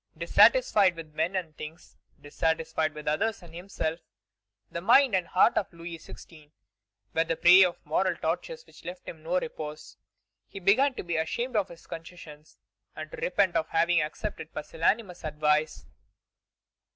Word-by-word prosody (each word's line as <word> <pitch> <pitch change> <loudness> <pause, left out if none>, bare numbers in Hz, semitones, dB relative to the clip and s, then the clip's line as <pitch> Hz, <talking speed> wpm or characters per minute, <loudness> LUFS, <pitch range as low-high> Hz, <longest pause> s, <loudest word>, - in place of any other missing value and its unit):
Dissatisfied 210 - +4
with 160 -2 -10
men 175 +5 -1
and 170 -5 -3
things, 155 +2 -10 0.2
dissatisfied 160 +1 -1
with 150 0 -9
others 195 +7 0
and 165 -2 -14
himself, 170 -2 -4 0.7
the 170 - -4
mind 245 +5 +5
and 185 -2 +1
heart 185 - +4
of 200 - -6
Louis 170 -1 -8
XVI. 155 -1 -14 0.6
were 165 - +2
the 165 0 -2
prey 180 +3 +7
of 180 -2 0
moral 180 +4 +1
tortures 470 - -4
which - - -18
left 180 +1 -9
him 160 - -8
no 175 +3 0
repose. 155 -2 -8 0.5
He 195 - -9
began 250 +9 +3
to - - -5
be 170 -2 -2
ashamed 235 +10 -2
of 200 -2 +1
his 170 -1 -14
concessions, 160 -2 -11 0.4
and - - -7
to - - -8
repent 445 - +1
of 160 - +1
having 165 0 +2
accepted 155 +2 -5
pusillanimous 175 +5 -1
advice. 150 - 0
170 Hz, 155 wpm, -28 LUFS, 155-190 Hz, 0.7 s, prey